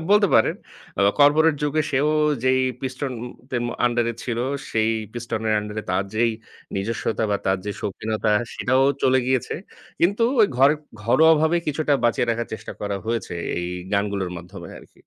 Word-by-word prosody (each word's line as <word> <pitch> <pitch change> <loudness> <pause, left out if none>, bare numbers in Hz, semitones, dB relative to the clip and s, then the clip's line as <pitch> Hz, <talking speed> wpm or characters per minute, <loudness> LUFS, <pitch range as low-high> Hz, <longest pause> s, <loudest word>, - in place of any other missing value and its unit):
বলতে 205 0 +6
পারেন। 110 - +4 0.4
অ - - +2 0.2
কর্পোরেট 155 +2 +5
যুগে 150 +1 +1
সেও 140 +2 +2 0.4
যেই 130 0 +3 0.2
পিস্টন 130 0 -4 0.4
তেম 120 -2 -1 0.2
আন্ডার 120 0 +2
এ - - -4
ছিল 120 -2 -2 0.3
সেই 110 0 +1 0.2
পিস্টন 120 -2 -4
এর 110 - +3
আন্ডার 105 +1 -7
এ - - -13
তার 95 +1 +1
যেই 115 +2 +3 0.4
নিজস্বতা 110 +3 -1
বা 100 - +2
তার 95 0 +2
যে 105 - -2
সৌখীনতা 110 +2 -2 0.2
সেটাও 130 +2 +2 0.2
চলে 130 0 +4
গিয়েছে। 130 -2 0 0.5
কিন্তু 200 +7 +2 0.2
ওই 210 - +7
ঘর 135 +2 +6 0.3
ঘরোয়াভাবে 160 +7 +4
কিছুটা 150 0 0
বাঁচিয়ে 120 0 +2
রাখার 115 0 -2
চেষ্টা - - -8
করা 100 -1 -2
হয়েছে 115 -5 -2 0.3
এই 90 - -3 0.3
গানগুলোর 100 -2 0
মাধ্যমে 85 +1 -10
আরকি। - - -19
120 Hz, 165 wpm, -23 LUFS, 105-145 Hz, 0.5 s, ওই